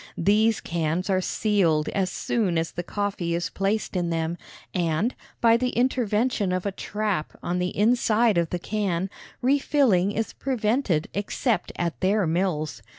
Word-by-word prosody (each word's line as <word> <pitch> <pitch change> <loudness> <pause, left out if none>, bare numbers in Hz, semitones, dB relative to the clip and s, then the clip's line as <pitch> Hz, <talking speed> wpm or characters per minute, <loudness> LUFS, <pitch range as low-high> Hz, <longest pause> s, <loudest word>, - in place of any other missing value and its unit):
These 215 +5 +3
cans 170 +3 -1
are 185 -1 +2
sealed 180 -7 +1
as 190 -2 0
soon 190 -2 0
as 165 0 -1
the 175 - -4
coffee 185 -2 -2
is 170 -2 -2
placed 200 +1 -1
in 175 -2 0
them, 165 0 -1 0.4
and, 175 +6 0 0.3
by 230 -1 +6
the 250 +1 0
intervention 235 -4 +1
of 185 +1 -1
a 200 - 0
trap 205 -4 -3
on 180 +1 -1
the 180 0 -2
inside 225 -2 +3
of 170 -1 0
the 180 - -1
can, 190 -1 -2 0.3
refilling 260 -8 +3
is 225 +1 -2
prevented 220 - 0
except 210 +3 -1
at 170 -2 -2
their 195 +1 +2
mills. 155 - -1
195 Hz, 155 wpm, -25 LUFS, 170-220 Hz, 0.4 s, by